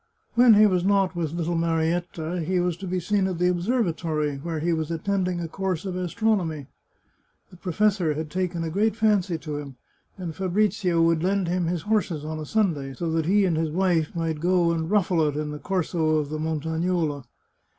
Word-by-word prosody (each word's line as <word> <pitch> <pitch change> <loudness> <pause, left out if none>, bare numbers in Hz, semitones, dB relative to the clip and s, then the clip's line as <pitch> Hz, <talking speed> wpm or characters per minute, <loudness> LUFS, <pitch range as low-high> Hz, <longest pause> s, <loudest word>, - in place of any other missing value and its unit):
When 235 -2 +7
he 215 +1 +7
was 185 -4 +2
not 195 -1 +2
with 165 -3 -2
little 170 0 -1
Marietta, 165 +1 -1
he 180 +3 0
was 175 -1 0
to 195 - -7
be 185 +1 -1
seen 195 +2 +1
at 185 -2 -3
the 180 +1 +2
observatory, 170 - 0
where 160 +3 -4
he 170 +2 0
was 160 -1 -2
attending 180 +1 -1
a 170 - -3
course 185 0 -3
of 185 -2 -3
astronomy. 180 -5 -1 0.9
The 180 - -14
professor 185 -2 +1
had 155 0 -5
taken 180 -2 -2
a 160 - -3
great 215 +5 +1
fancy 205 -6 +2
to 150 -2 -5
him, 140 -2 -7 0.4
and 175 -4 -5
Fabrizio 185 -2 +1
would 165 -1 +3
lend 190 +1 +1
him 175 0 0
his 170 -2 -2
horses 195 -8 0
on 155 0 -4
a 155 - -6
Sunday, 155 -11 0
so 165 +4 -2
that 160 -1 0
he 200 +2 +4
and 175 -3 +1
his 160 0 0
wife 170 -2 +1
might 165 -2 -2
go 175 0 +2
and 165 -1 -2
ruffle 185 -5 +2
it 145 0 -2
in 150 0 -3
the 150 - -6
Corso 165 -4 0
of 150 -2 -1
the 155 0 -4
Montagnola. 160 -1 -1
175 Hz, 200 wpm, -25 LUFS, 160-190 Hz, 0.9 s, When